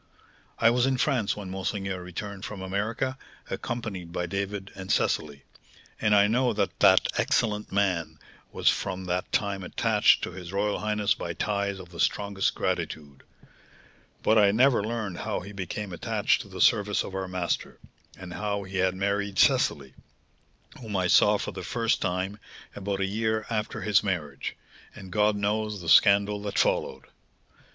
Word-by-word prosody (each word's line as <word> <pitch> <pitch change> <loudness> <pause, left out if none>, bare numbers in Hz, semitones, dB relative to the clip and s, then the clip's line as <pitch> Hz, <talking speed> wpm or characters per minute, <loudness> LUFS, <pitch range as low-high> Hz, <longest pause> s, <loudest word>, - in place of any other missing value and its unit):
"I 115 - +5
was 125 +2 +2
in 135 -1 +1
France 125 -7 +1
when 100 -3 -6
monseigneur 95 0 -3
returned 95 +3 -7
from 100 -3 -6
America, 110 +7 -2 0.3
accompanied 100 -8 -4
by 90 0 -2
David 100 +2 -4
and 95 -2 -6
Cecily, 70 -2 0 0.6
and 105 -1 +4
I 100 0 +6
know 120 +3 +2
that 105 - -2
that - - +6
excellent 105 -2 0
man 95 -4 0 0.3
was - - -3
from 95 0 +1
that 90 0 -2
time 100 -2 0
attached - - +3
to - - -3
his 90 -1 -8
royal 100 +1 0
highness 105 -1 +1
by - - -5
ties 100 -1 -1
of 90 -2 -11
the 85 -1 -12
strongest 100 -1 0
gratitude; 70 -3 -3 1.0
but 110 0 +4
I 100 -1 +6
never 120 +1 +4
learned 110 -5 -3
how - - -2
he 100 +3 -9
became 100 0 -5
attached 85 - +1
to - - -11
the - - -6
service 105 0 +3
of 95 - -8
our 95 0 -3
master, 90 -2 -2 0.4
and 90 -1 -9
how 100 +1 -2
he 95 0 -6
had 95 0 +2
married 100 0 -1
Cecily, 70 -2 +3 0.9
whom 110 -4 -6
I 90 - +1
saw, 90 - +5
for - - -4
the - - -7
first 115 -1 0
time, 95 +3 -2 0.4
about 100 0 -3
a - - +2
year 110 +2 -1
after 105 -1 -2
his 105 -2 +3
marriage; 75 -9 -3 0.4
and 95 -3 -10
God 105 +2 +3
knows 105 +1 -1
the 85 -2 -5
scandal 100 +2 +5
that 100 -1 -4
followed!" - - +1
100 Hz, 165 wpm, -27 LUFS, 95-105 Hz, 1.0 s, I